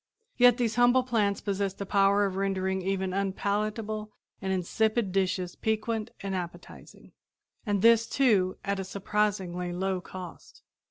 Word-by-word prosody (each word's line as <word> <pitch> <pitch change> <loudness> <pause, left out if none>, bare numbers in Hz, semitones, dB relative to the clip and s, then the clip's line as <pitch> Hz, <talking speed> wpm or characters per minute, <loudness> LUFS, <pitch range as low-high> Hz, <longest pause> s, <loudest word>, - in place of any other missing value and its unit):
Yet 245 -1 +6
these 235 -2 -1
humble 245 +1 +5
plants 215 -5 0
possess 200 -1 -2
the 200 - -5
power 200 +1 +3
of 190 -1 -3
rendering 190 -1 -1
even 190 0 -1
unpalatable 210 +2 -2 0.3
and 190 -1 -2
insipid 215 +3 0
dishes 185 -1 -1
piquant 220 0 -2
and 195 -1 -3
appetizing, 175 -1 -8 0.6
and 205 -2 0
this, 230 0 +6
too, 205 -9 +2
at 200 -1 -1
a - - -2
surprisingly 190 -2 -1
low 185 +1 -2
cost. 180 -1 -10
200 Hz, 140 wpm, -28 LUFS, 190-215 Hz, 0.6 s, Yet